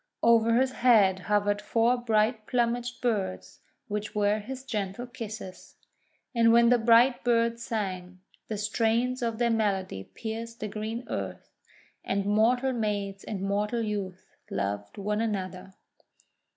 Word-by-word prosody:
Over 230 0 +5
his 260 +2 +3
head 215 -8 +4
hovered 205 +2 +1
four 230 +3 +2
bright 220 -1 +1
plumaged 240 0 -1
birds, 205 -6 -2 0.3
which 210 +1 -4
were 210 0 +2
his 260 +5 -7
gentle 210 -2 -3
kisses. 220 -6 -8 0.6
And 230 -1 +4
when 235 0 +6
the 245 0 +4
bright 235 +3 +5
birds 235 -1 +2
sang, 185 -5 -4 0.3
the 215 - -3
strains 230 +4 0
of 230 -2 -1
their 235 0 +2
melody 195 - -1
pierced 230 +1 -6
the 215 - -3
green 220 +4 -5
earth, - - -5 0.5
and 195 0 -1
mortal 240 +6 +2
maids 205 -4 -2
and 205 -4 -5
mortal 210 +4 0
youths 195 -4 -4 0.2
loved 100 +1 -3
one 210 +2 -1
another. 190 -3 -4
220 Hz, 135 wpm, -28 LUFS, 200-235 Hz, 0.6 s, when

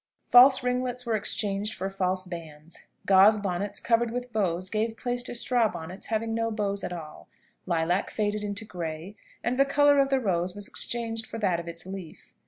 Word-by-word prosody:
False 260 +2 +7
ringlets 250 0 -1
were 230 -2 0
exchanged 205 0 -1
for 190 - -3
false 185 -1 0
bands; 165 -3 -10 0.2
gauze 200 +3 +6
bonnets 200 0 -3
covered 235 0 +2
with 245 0 -5
bows 185 -4 0
gave 225 +1 -1
place 245 0 -2
to 245 - -5
straw 240 -1 +2
bonnets 175 +3 -8
having 225 0 -1
no 230 0 0
bows 200 -3 -2
at - - -3
all; 160 -3 -8 0.4
lilac 175 +2 0
faded 210 -1 -1
into 205 +1 -4
grey, 170 0 -6 0.3
and 250 +2 -1
the - - +8
colour 285 +1 +4
of 275 0 +3
the 270 -1 +2
rose 180 -5 -1
was 205 0 -5
exchanged 225 -1 -3
for - - -7
that 190 -6 +1
of 170 - -8
its 170 +1 -6
leaf. 190 -3 -9
205 Hz, 190 wpm, -27 LUFS, 185-235 Hz, 0.4 s, the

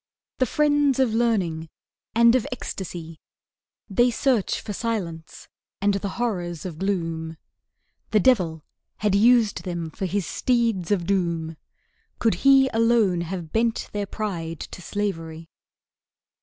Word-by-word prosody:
The 255 - +3
friends 290 0 +2
of 260 -4 +2
Learning 190 -9 0 0.5
and 235 0 +6
of 255 -3 +1
Ecstasy, 170 -8 -6 0.7
They 240 +5 +3
search 245 -3 +1
for 210 - -6
silence 185 -8 -4 0.3
and 200 +1 +2
the 200 0 -2
horrors 180 -9 -2
of 165 -4 -6
gloom; 165 -4 -2 0.7
The 215 - +3
devil 180 - +2 0.3
had 210 -2 0
used 225 +1 +4
them 170 -3 -4
for 190 +2 -3
his 195 0 -1
steeds 230 -4 0
of 195 -5 +1
Doom, 170 -4 -1 0.6
Could 225 - +2
he 270 -1 +6
alone 225 -6 +3
have 170 -2 -5
bent 225 0 0
their 205 -1 -3
pride 170 -7 -4
to - - -8
slavery. 165 -5 -4
200 Hz, 130 wpm, -24 LUFS, 170-230 Hz, 0.7 s, and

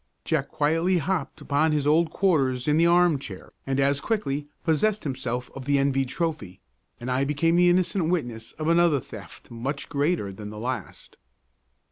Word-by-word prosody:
Jack - - 0
quietly 165 +5 +1
hopped 170 -2 -2
upon 155 +2 +1
his 150 -2 0
old 160 +3 +3
quarters 135 -10 +1
in 150 +1 +3
the 165 +1 +5
armchair 170 - +1
and 135 0 0
as 140 +1 +2
quickly 150 -10 -2 0.2
possessed 205 +7 +1
himself 125 -3 -3
of 135 -1 -8
the 140 0 +2
envied 135 -1 +1
trophy, 155 - -3 0.4
and 125 +2 -4
I 130 +2 +1
became 150 +4 +1
the 175 0 +5
innocent 180 -1 +1
witness 120 -10 -3
of 155 +1 -5
another 170 -3 +4
theft - - -12
much 135 +5 -4
greater 145 - 0
than 105 +2 -8
the 105 - -9
last. 125 +2 -6
145 Hz, 165 wpm, -25 LUFS, 130-170 Hz, 0.4 s, the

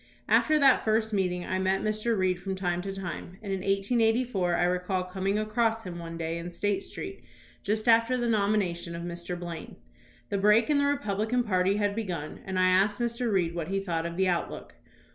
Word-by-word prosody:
After 310 -1 +4
that 275 -3 +5
first 220 0 +1
meeting, 180 -3 0
I 185 - -1
met 190 +1 +1
Mr. 215 +1 0
Reed 185 -1 +1
from 190 0 -3
time 180 -2 -1
to 195 +1 -4
time, 185 -1 -6
and 200 -2 -3
in 190 - -1
1884 210 -1 +1
I 175 - +2
recall 180 +1 0
coming 190 +2 -1
across 225 +1 0
him 175 -2 -6
one 165 0 -7
day 165 0 -3
in 170 +1 -6
State 195 +2 -1
Street 385 0 -8 0.4
just 215 +3 -1
after 230 +2 +4
the 240 -1 -1
nomination 200 -6 0
of 170 - -5
Mr. 175 0 -5
Blaine. 170 -2 -7 0.5
The 200 - -1
break 210 +6 +4
in 290 - +3
the 285 - +2
Republican 245 -3 0
party 190 -2 +2
had 205 -1 0
begun, 180 -9 -4
and 190 -1 -3
I 185 0 +4
asked 195 +3 +3
Mr. 235 0 -1
Reed 175 -4 +1
what 170 -2 -3
he 195 +2 -1
thought 170 -4 -2
of 170 0 -7
the 190 0 +2
outlook. 175 -2 -2
195 Hz, 200 wpm, -28 LUFS, 180-220 Hz, 0.5 s, that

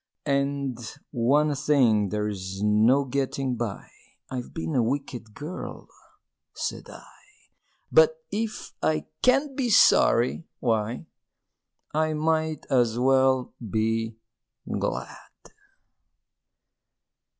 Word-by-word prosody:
And, 140 -3 -1 0.3
"One 145 +4 +2
thing 130 -8 +3
there's 100 -2 -3
no 110 +7 +4
getting 135 -1 -1
by 115 -4 -4 0.4
I've 125 -2 -5
been 165 -1 -4
a 130 - +3
wicked 120 -3 -3
girl," 155 +5 -7 0.7
said - - -4
I; - - -12 0.9
"But 485 0 +6 0.2
if 220 +1 -4
I 155 -1 0 0.2
can't 270 +2 +3
be 260 -3 0
sorry, 130 - +4
why, 115 -1 -1 0.9
I 155 +1 +1
might 160 0 0
as 120 -3 +3
well 130 0 +3
be 110 +1 -1 0.5
glad!" - - -3
130 Hz, 95 wpm, -26 LUFS, 115-150 Hz, 0.9 s, But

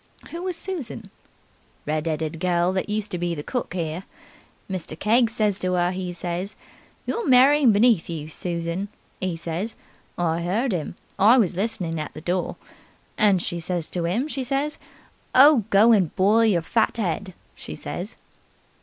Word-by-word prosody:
"Who 335 - -5
was 365 -2 -3
Susan?" 275 - -6 0.7
"Red 155 +1 -1
'eaded 160 +1 -3
gel 180 0 +2
that 190 +2 -2
used 210 0 -2
to 180 - -2
be 175 -1 -1
cook 245 - -4
'ere. 170 +1 -3 0.6
Mr. 180 -5 -5
Keggs 230 +3 +2
says 210 -4 +1
to 185 0 0
'er, 175 0 +2
'e 185 -1 -4
says, 175 +3 -4 0.5
'You're 460 -6 -2
marrying 265 0 +6
beneath 210 -4 +3
you, 155 -3 -5
Susan', 170 +3 -3 0.3
'e 185 -2 -1
says. 170 +6 -4 0.4
I 170 -1 0
'eard 210 +8 0
'im. 170 -1 -3 0.2
I 220 +6 +7
was 205 -7 +3
listenin' 185 -5 -1
at 150 - -6
the 155 - -8
door. 175 +2 -1 0.6
And 200 -5 +3
she 175 - -2
says 170 -1 -3
to 170 -2 -1
'im, 230 - 0
she 275 -3 -3
says, 275 +4 -2 0.6
'Oh, 270 -4 +7
go 210 +4 +6
and 195 -7 +3
boil 215 +4 +4
your 180 -7 +2
fat 225 +7 +1
'ead', 190 -2 -2 0.2
she - - -8
says." - - -6
190 Hz, 165 wpm, -24 LUFS, 170-230 Hz, 0.7 s, I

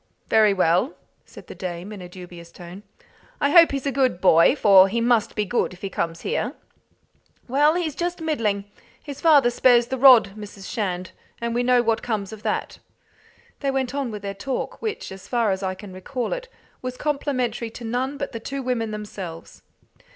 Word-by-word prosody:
Very 215 -2 +5
well," 185 - +2 0.3
said - - -14
the - - -10
dame, 180 +2 -6
in 200 - -9
a 180 - -9
dubious 175 -2 -11
tone. 175 +3 -11 0.6
"I 285 0 +1
hope 335 0 +7
he's 275 -1 -3
a 280 - 0
good 255 -8 +1
boy, 170 - +5
for 195 -7 +6
he 230 +4 -1
must 235 -2 +1
be 210 - 0
good 235 -3 -1
if 180 - -16
he 195 - -4
comes 165 -1 -3
here." 465 - -2 0.9
"Well, 295 +5 +3
he's 340 -4 -1
just 350 +4 -3
middling. 230 -11 -1 0.4
His 285 -2 -8
father 290 -7 +5
spares 240 -1 +4
the 265 - -3
rod, 245 -7 +7
Mrs. 205 -2 -10
Shand, 185 -5 -3 0.3
and 235 0 -2
we 240 - +1
know 245 0 +3
what 225 -1 +1
comes 210 -4 -3
of 215 - -10
that." - - -3 0.8
They 280 - -1
went 265 -1 -1
on 280 -3 -2
with 210 -2 -7
their 200 0 -4
talk, 250 +6 -4
which, 440 - -4
as 190 0 -11
far 235 -4 +1
as 190 0 -2
I 190 -1 -2
can 190 0 -11
recall 235 +7 -4
it, - - -6 0.3
was 255 0 -5
complimentary 255 -6 -2
to 235 +1 -9
none 255 +5 -2
but 280 - -4
the 230 - -6
two 275 +4 -5
women 240 -3 -1
themselves. 200 -6 -8
230 Hz, 195 wpm, -23 LUFS, 195-270 Hz, 0.9 s, hope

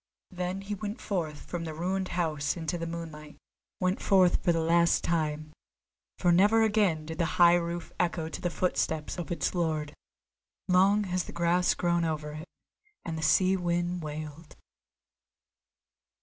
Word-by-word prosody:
Then 180 +1 -3
he 200 +1 -5
went 205 +1 -5
forth 160 -7 -3
from 175 -1 -4
the 160 -2 -5
ruined 185 +3 -1
house 155 -3 -1
into 165 +1 -3
the 165 -1 -4
moonlight, 160 -3 -8 0.4
went 185 +1 0
forth 185 -3 +3
for 175 - +3
the 165 - +1
last 170 +1 +3
time; 155 -2 -1 0.6
for 175 - +3
never 205 +6 +5
again 205 -8 +2
did 160 +1 -7
the 170 - +2
high 175 -1 +7
roof 170 0 -2
echo 170 -2 0
to 160 - -7
the 175 - 0
footstep 160 -3 -1
of 175 - -5
its 170 - -1
lord. 155 -4 -1 0.7
Long 195 +3 +4
has 185 -2 -2
the - - -8
grass 170 +1 +2
grown 175 -1 +1
over 155 -2 -2
it, 155 +3 -8 0.6
and 165 - -3
the 160 - -4
sea 185 +5 +4
wind 175 0 -1
wailed! 155 0 -7
170 Hz, 160 wpm, -29 LUFS, 160-180 Hz, 0.7 s, high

